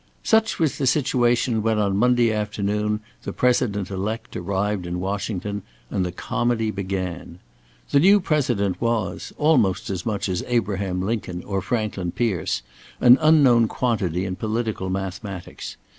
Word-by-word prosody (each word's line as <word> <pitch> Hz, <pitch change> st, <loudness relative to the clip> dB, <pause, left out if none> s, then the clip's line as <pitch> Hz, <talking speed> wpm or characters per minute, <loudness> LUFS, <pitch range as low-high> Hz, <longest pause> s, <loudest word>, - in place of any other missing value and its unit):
Such 220 Hz, 0 st, +2 dB
was 150 Hz, -4 st, 0 dB
the 135 Hz, -, +1 dB
situation 120 Hz, -4 st, +2 dB
when 110 Hz, 0 st, +1 dB
on 100 Hz, -2 st, +1 dB
Monday 120 Hz, +1 st, +3 dB
afternoon 105 Hz, 0 st, -1 dB, 0.2 s
the -, -, -5 dB
President 110 Hz, -6 st, +1 dB
elect 110 Hz, +4 st, -4 dB
arrived 95 Hz, +1 st, -2 dB
in 90 Hz, +1 st, -3 dB
Washington, 100 Hz, +1 st, -3 dB, 0.3 s
and 95 Hz, -, 0 dB
the 90 Hz, -, -2 dB
comedy 120 Hz, +2 st, -1 dB
began. 95 Hz, -3 st, -4 dB, 0.5 s
The 140 Hz, -, +5 dB
new 195 Hz, +6 st, +6 dB
President 125 Hz, -, 0 dB
was, 115 Hz, -6 st, -1 dB
almost 125 Hz, -, +2 dB
as 95 Hz, -2 st, -3 dB
much 105 Hz, -3 st, -2 dB
as 90 Hz, -2 st, -2 dB
Abraham 100 Hz, -6 st, -1 dB
Lincoln 95 Hz, -4 st, -3 dB
or 95 Hz, -1 st, -2 dB
Franklin 100 Hz, -4 st, -2 dB
Pierce, 105 Hz, -9 st, -1 dB, 0.4 s
an 125 Hz, +1 st, +7 dB
unknown 140 Hz, -7 st, +5 dB
quantity 95 Hz, -9 st, -1 dB
in 90 Hz, -1 st, -4 dB
political 110 Hz, -2 st, -2 dB
mathematics. 95 Hz, 0 st, -5 dB
105 Hz, 140 wpm, -23 LUFS, 95-120 Hz, 0.5 s, an